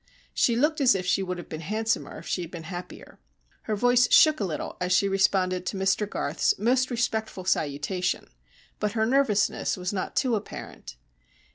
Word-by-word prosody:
She 235 - +2
looked 300 +5 +1
as 260 -5 +5
if 185 -1 -2
she 180 +2 +1
would 180 -1 -3
have 175 - -8
been 155 - -7
handsomer 220 +6 -2
if - - -11
she 180 - -2
had 170 - -6
been 170 -2 -8
happier. 175 +2 -9 0.5
Her 215 - -1
voice 245 +3 +3
shook 310 -1 +6
a - - -1
little 170 -6 -4
as 180 0 -1
she 190 +2 +4
responded 190 -2 +1
to 195 - -2
Mr 195 +2 +1
Garth's - - 0
most 250 +5 +2
respectful 220 -5 -2
salutation, 160 +2 -1 0.5
but 210 -1 -1
her 220 -1 +1
nervousness 235 -7 +1
was 180 +2 -3
not 190 - -4
too 255 -3 +1
apparent. 205 - -8
200 Hz, 180 wpm, -26 LUFS, 180-235 Hz, 0.5 s, shook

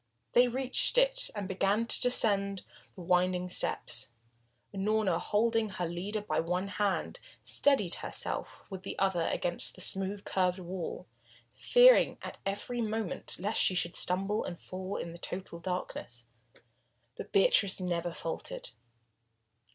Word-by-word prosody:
They 245 +1 +6
reached 260 - 0
it, - - +4
and 205 -2 -3
began 195 +4 +1
to - - +2
descend 200 -6 +2 0.3
the 185 - -9
winding 180 +1 +1
steps. 130 -7 +1 0.7
Unorna, 200 -3 +1
holding 225 +2 +1
her 185 -2 -3
leader 185 +6 -3
by 210 - -1
one 180 +4 -1
hand, 200 0 -1 0.2
steadied 265 -12 +3
herself - - -4
with 190 -2 -7
the - - -6
other 190 -4 +1
against 175 -1 -2
the 185 - -11
smooth, 195 +2 -4
curved 185 -1 +1
wall, 180 -1 -5 0.5
fearing - - +6
at - - -7
every 235 +5 -3
moment 220 -3 -2
lest 205 +5 0
she 185 - +3
should 170 -1 0
stumble 195 +4 0
and 175 - -6
fall 185 +1 -6
in 170 - -5
the 170 - -10
total 180 -1 -6
darkness. 165 -9 -5 0.9
But - - -8
Beatrice 195 0 +4
never 175 -1 -2
faltered. 165 -8 -6
190 Hz, 135 wpm, -31 LUFS, 180-215 Hz, 0.9 s, They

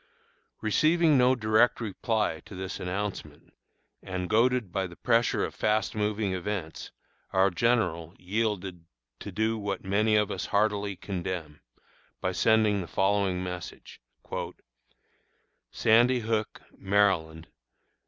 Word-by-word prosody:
Receiving 160 -1 +3
no 130 0 +4
direct 110 +1 +3
reply 110 -4 -1
to 100 - -10
this 95 +1 -5
announcement, 100 +2 -5 0.5
and 90 -2 -5
goaded 120 -2 +2
by 95 +1 -1
the 85 - -13
pressure 115 +3 +1
of - - -7
fast 105 -2 0
moving 105 -2 -1
events, 95 -3 -5 0.4
our 95 +1 +4
General 90 -6 0
yielded 95 -3 -3 0.3
to - - -7
do 110 +1 0
what 100 -2 -3
many 105 +3 +2
of 105 -1 +2
us - - -4
heartily 100 -1 0
condemn, 90 -6 -5 0.6
by 95 - -1
sending 110 0 +3
the 85 - -7
following 95 -1 +1
message: 90 -1 -8 1.7
SANDY 120 +3 +3
HOOK, 110 -1 -2 0.2
MD. 95 -5 +1
100 Hz, 115 wpm, -28 LUFS, 95-110 Hz, 1.7 s, no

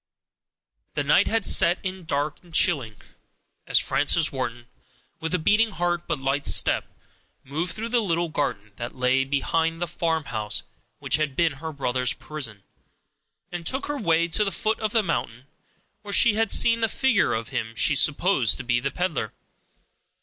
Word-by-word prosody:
The - - -1
night - - +3
had 225 -2 0
set 175 -1 +5
in 185 -2 -6
dark 145 -1 -2
and 175 - -20
chilling, 140 - +1 0.7
as - - +3
Frances 150 +2 +2
Wharton, 120 -3 -5 0.5
with 160 0 -4
a - - +2
beating 210 +6 +2
heart 175 0 -2
but - - -1
light 135 +1 -1
step, - - +3 0.6
moved 155 +7 -4
through 225 +2 -5
the 240 0 +2
little 170 -4 -1
garden 115 -9 -3
that 120 +1 -6
lay 130 +1 +1
behind 160 +4 -1
the 175 - -1
farmhouse 160 -11 -2 0.3
which - - +1
had 150 -3 -2
been 170 0 +2
her 160 +4 -7
brother's 125 -3 -1
prison, 115 -10 -5 0.9
and 175 -1 -6
took 265 +2 +1
her 290 -1 -3
way 170 -4 +1
to 175 +6 +2
the 200 - -2
foot 220 +3 -1
of 215 -2 -2
the 225 -1 +2
mountain, 125 - -4 0.6
where 205 0 -9
she 235 - +5
had 225 -1 0
seen 230 0 +5
the 225 - +1
figure 245 - +1
of 115 0 -5
him 115 0 -4
she 150 - +4
supposed 145 - +3
to - - -6
be 120 0 0
the 135 +3 -2
peddler. 180 +2 -3
160 Hz, 170 wpm, -24 LUFS, 135-190 Hz, 0.9 s, set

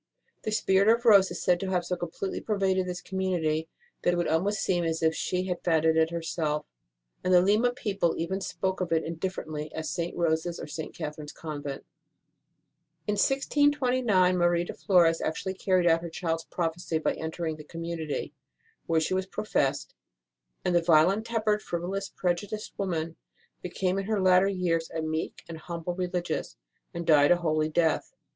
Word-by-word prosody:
The 215 - -3
spirit 195 -2 +3
of 235 +2 +3
Rose 200 -4 +7
is - - -5
said 180 -1 +3
to 195 - -3
have 180 -2 0
so 180 - -1
completely 175 +2 -4
pervaded 190 -3 0
this 180 0 -4
community 170 -4 -1 0.3
that 175 - +2
it - - -2
would 175 - 0
almost 195 +6 +1
seem 175 -2 +1
as 165 0 -1
if 160 0 +4
she 180 +2 -1
had 180 -2 -3
founded 160 -2 +3
it 160 0 +3
her 170 -1 -4
self, 150 -2 -1 0.6
and 185 - +1
the 180 - +8
Lima 210 +6 +3
people 200 -8 -1
even 190 +4 -2
spoke 190 0 -2
of 180 - -2
it 165 -1 +2
indifferently 160 -3 -4
as 160 -1 -3
St. 170 0 -3
Rose 160 -1 +1
s 170 - -4
or - - -5
St. 155 +1 -7
Catherine 150 -2 -6
s - - -7
Convent. 145 -3 -6 1.2
In 210 - 0
1629 255 -6 +2
Marie 175 0 +3
de - - -6
Flores 170 -4 +3
actually 190 +4 -2
carried 185 -2 +1
out 165 -1 +4
her 170 - -5
child 165 0 -2
s - - -20
prophecy 165 -1 -2
by 160 - 0
entering 160 0 -4
the 150 - -10
community, 165 -2 -4 0.5
where 165 -1 +3
she 160 - -1
was 190 0 -1
professed; 190 -9 -1 0.7
and 180 - +2
the 175 - +4
violent 170 +6 +4
tempered, 215 -2 +1
frivolous, 190 +3 -3
prejudiced 200 +4 -3
woman 165 -4 -2 0.4
became 185 +1 -1
in 195 - -3
her 215 0 0
latter 185 0 +5
years 175 -4 0
a 160 - -4
meek 160 +1 -3
and 165 -1 -7
humble 170 +1 -5
Religious, 180 - -3 0.3
and 170 0 -5
died 150 -3 +6
a 175 - +7
holy 155 -2 0
death. 160 0 0
175 Hz, 180 wpm, -28 LUFS, 160-190 Hz, 1.2 s, the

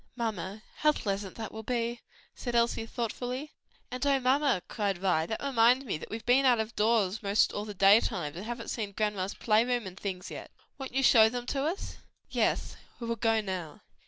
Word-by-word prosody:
"Mamma, 215 -3 -4
how 300 0 +4
pleasant 200 -6 -3
that 220 -2 -6
will 220 - -7
be," 235 0 -2 0.3
said 240 -2 -4
Elsie 235 -1 +1
thoughtfully. 250 +5 -4 0.4
"And 250 +1 -4
oh, 275 -1 +3
mamma!" 260 -5 +2
cried 200 -4 -1
Vi, 175 -3 +1
"that 220 - -4
reminds 255 0 +4
me 190 -10 -3
that - - -9
we've 225 +1 -6
been 255 +3 +4
out 250 -3 +4
of 220 +1 -3
doors 215 -2 +2
'most 200 0 +2
all 205 - -3
the 210 -1 -7
day 195 +3 +7
times, 150 -8 -3
and 180 - -6
haven't 235 +1 -5
seen 210 -4 -4
grandma's 205 -2 -1
play 215 0 +3
room 245 -2 -1
and 185 0 -9
things 185 -2 -5
yet. - - -8 0.3
Won't 265 -1 -7
you 270 - +2
show 220 -3 +7
them 245 +1 -4
to 275 +2 -1
us?" 340 +6 -3 0.3
"Yes, - - 0 0.2
we 235 - -5
will 230 0 -1
go 225 -1 +2
now." 185 -6 -5
225 Hz, 205 wpm, -29 LUFS, 200-245 Hz, 0.4 s, day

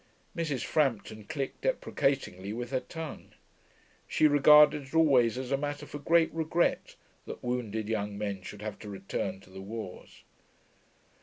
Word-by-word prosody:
Mrs. 150 -7 -2
Frampton 115 -7 0
clicked 135 +5 -4
deprecatingly 135 - -1
with 120 +2 -5
her 130 - +1
tongue. 160 +1 -8 0.7
She - - +2
regarded 150 +1 +7
it 130 - -17
always 130 -8 +4
as 130 0 -5
a 135 - +3
matter 145 +1 -4
for 145 - -7
great 165 +3 +3
regret 165 +1 0 0.3
that - - -8
wounded 110 -4 -2
young 105 -2 -2
men 100 -2 -3
should 105 +3 -9
have 105 -1 -5
to 105 - -9
return 95 -1 -4
to 95 - -18
the 95 0 -9
wars. 105 -2 -8
125 Hz, 150 wpm, -30 LUFS, 105-150 Hz, 0.7 s, regarded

